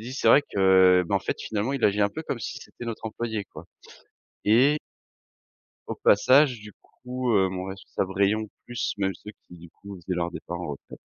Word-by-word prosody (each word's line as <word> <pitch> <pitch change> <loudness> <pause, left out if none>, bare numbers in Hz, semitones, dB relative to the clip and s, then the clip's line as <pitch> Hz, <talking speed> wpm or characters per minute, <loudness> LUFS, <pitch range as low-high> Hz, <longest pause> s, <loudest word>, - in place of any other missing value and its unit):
dit: 125 - -6
«C'est - - +1
vrai 145 - +7
que, 95 -4 +4
bah, - - 0
en - - -1
fait, - - -3
finalement, 110 +5 -2
il 135 -3 -1
agit 105 +1 +2
un 100 - +4
peu 160 +9 -7
comme 135 - -4
si - - -6
c'était 120 - -11
notre 115 -1 -5
employé», 110 -1 -4
quoi - - -11 0.8
et 130 +8 +4 1.1
au - - -3
passage, 130 +4 +4
du 105 0 -12 0.3
coup, 125 0 -2
heu, 95 -3 +3
mon 95 0 -5
responsable 95 0 -5
rayon 105 +2 +1 0.2
plus 120 -2 -3
même 95 -1 0
ceux 105 - -11 0.2
qui, 90 - -13
du 85 -1 -14
coup, 100 0 -12
faisaient 90 0 -5
leur 85 0 -2
départ 85 0 -6
en 85 -4 -5
retraite 70 - -10
105 Hz, 205 wpm, -25 LUFS, 95-120 Hz, 1.1 s, vrai